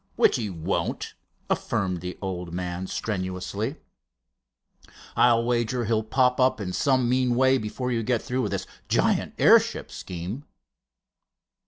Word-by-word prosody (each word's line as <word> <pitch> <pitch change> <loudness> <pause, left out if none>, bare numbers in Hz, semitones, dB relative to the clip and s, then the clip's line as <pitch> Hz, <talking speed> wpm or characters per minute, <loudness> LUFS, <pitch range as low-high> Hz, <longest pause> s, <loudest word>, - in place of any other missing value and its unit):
"Which - - +4
he 110 -4 -3
won't," 80 -4 -2 0.3
affirmed 90 -3 -1
the 90 0 -6
old 90 -2 -4
man, 90 +1 -3
strenuously. 100 +6 -3 1.4
"I'll 115 -1 +5
wager 120 0 0
he'll 110 0 +1
pop 125 +3 +2
up 130 -1 +3
in 95 -3 -4
some 130 -1 +2
mean 125 0 +2
way 130 +1 +4
before 125 +4 -3
you 115 -1 0
get 120 0 0
through 130 +1 -1
with - - -2
this - - -2 0.2
giant - - +1
airship - - +4
scheme." 95 - -6
115 Hz, 135 wpm, -26 LUFS, 95-125 Hz, 1.4 s, I'll